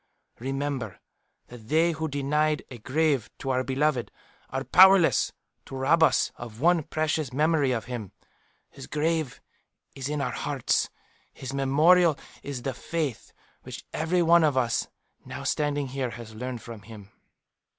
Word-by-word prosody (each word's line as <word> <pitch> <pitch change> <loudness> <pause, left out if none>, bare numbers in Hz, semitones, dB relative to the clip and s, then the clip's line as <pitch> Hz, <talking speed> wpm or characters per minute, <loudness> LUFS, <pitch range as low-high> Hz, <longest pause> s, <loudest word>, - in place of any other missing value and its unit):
"Remember 135 -5 -3 0.5
that 120 -3 -12
they 165 +2 +3
who 160 0 -3
denied 150 +2 0
a 120 - -8
grave 140 -1 0
to 135 - -3
our 130 0 +1
beloved, 130 -3 0 0.4
are 135 +1 -3
powerless 190 +2 +6 0.3
to - - -9
rob 145 +6 +2
us 155 -5 +4
of 115 -2 -9
one 170 +3 +4
precious 155 -2 -1
memory 150 0 +2
of 115 -4 -2
him. 120 -6 -6 0.6
His - - -11
grave 155 -3 -1 0.5
is 135 0 -5
in 150 0 -2
our 140 - -1
hearts; 145 -4 0 0.4
his 135 0 -7
memorial 155 +4 +4 0.2
is 135 -4 -6
the 135 - -2
faith 150 0 -4 0.3
which - - -9
every 170 +3 +1
one 170 0 +5
of 145 -4 +2
us 120 -3 +1 0.4
now - - -7
standing 145 -2 -1
here 130 -1 -2
has 115 -2 -9
learned 125 +1 -6
from 115 -3 -9
him." 105 -2 -12
140 Hz, 150 wpm, -27 LUFS, 125-155 Hz, 0.6 s, powerless